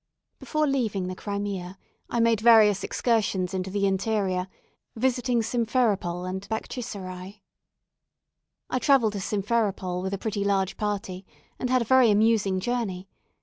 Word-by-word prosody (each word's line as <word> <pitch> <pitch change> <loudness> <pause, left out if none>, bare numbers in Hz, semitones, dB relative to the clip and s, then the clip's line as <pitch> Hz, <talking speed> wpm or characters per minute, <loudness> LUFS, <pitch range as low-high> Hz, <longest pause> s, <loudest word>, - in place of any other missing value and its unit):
Before 305 -1 0
leaving 230 -9 0
the 185 0 -4
Crimea, 200 -2 -4 0.3
I 235 - -1
made 230 -2 +3
various 215 -4 +6
excursions 200 -6 0
into 190 0 -2
the 200 +1 0
interior, 195 -2 0 0.5
visiting 245 0 +1
Simpheropol 215 -7 0
and 190 +2 -5
Baktchiserai. 200 -4 -6 1.2
I 255 - -1
travelled 250 -6 +3
to 200 - -3
Simpheropol 200 -3 -1
with 190 +1 -2
a - - -5
pretty 205 0 -2
large 195 -2 0
party, 200 -3 -3 0.4
and 250 - -2
had 255 -1 +3
a - - -10
very 260 0 +5
amusing 210 -2 +3
journey. 195 -4 -3
205 Hz, 135 wpm, -26 LUFS, 190-230 Hz, 1.2 s, various